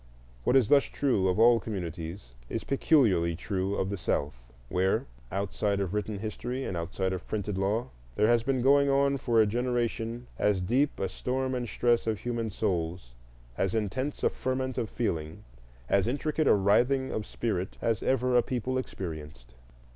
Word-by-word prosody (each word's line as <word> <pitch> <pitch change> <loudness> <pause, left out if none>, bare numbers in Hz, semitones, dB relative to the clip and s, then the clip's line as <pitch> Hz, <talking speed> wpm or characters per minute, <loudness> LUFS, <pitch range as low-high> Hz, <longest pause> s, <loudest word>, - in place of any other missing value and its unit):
What - - +3
is 130 -6 +4
thus 145 -1 +6
true 120 -10 +1
of 90 - +1
all 115 +1 +6
communities 85 - -6 0.2
is - - -3
peculiarly 105 - +3
true 95 +2 -2
of 95 0 -1
the 100 - -3
South, 70 -6 -1 0.3
where, 95 +6 +1 0.3
outside 100 +1 -1
of 95 -1 -2
written 105 0 -2
history 120 +5 -4
and 95 - -3
outside 95 +3 -2
of 95 - -6
printed 105 -2 -2
law, 100 +5 0 0.3
there - - +3
has 120 +1 +4
been 130 0 0
going 140 +1 +5
on 140 0 +3
for 120 -3 +1
a 110 - +6
generation 120 +1 -1
as 105 -2 +2
deep 130 +11 +1
a 95 - 0
storm 130 +7 -2
and 120 -2 -2
stress 120 +1 +1
of 110 -1 +1
human 115 0 -3
souls, 85 - -2 0.5
as 95 +2 +1
intense 130 +7 -2
a - - +3
ferment 130 0 -2
of 115 - -2
feeling, 80 -9 -3 0.4
as 100 - +2
intricate 150 +4 0
a - - +6
writhing 125 +7 +2
of 105 - -3
spirit, 95 -5 -3
as 115 -3 0
ever 125 -1 +1
a 120 - +6
people 130 +1 -2
experienced. 75 - -7
110 Hz, 170 wpm, -29 LUFS, 95-125 Hz, 0.5 s, thus